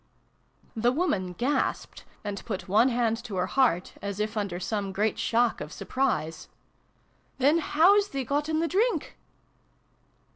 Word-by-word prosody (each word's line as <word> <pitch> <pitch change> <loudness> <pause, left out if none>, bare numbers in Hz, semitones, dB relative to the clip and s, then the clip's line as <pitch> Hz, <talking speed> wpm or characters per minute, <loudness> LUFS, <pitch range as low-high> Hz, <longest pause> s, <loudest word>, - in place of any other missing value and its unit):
The 235 +2 +2
woman 210 - -1
gasped, 255 +10 -2 0.2
and 205 -2 -5
put. 200 -4 -5
one 215 +7 +4
hand 235 -1 0
to 215 -5 -6
her 180 0 +1
heart, 190 -5 +1
as 200 0 -4
if 215 +1 -2
under 200 -5 -2
some 200 +1 -2
great 210 +3 0
shock 235 0 +1
of 150 +1 -6
surprise. 195 - -2 0.4
" - - -39
Then 290 +5 +4
how 340 +6 +5
's 405 - -1
thee 275 -7 -3
gotten 305 +5 0
th' - - -8
drink 450 +6 0
230 Hz, 150 wpm, -27 LUFS, 200-280 Hz, 0.4 s, how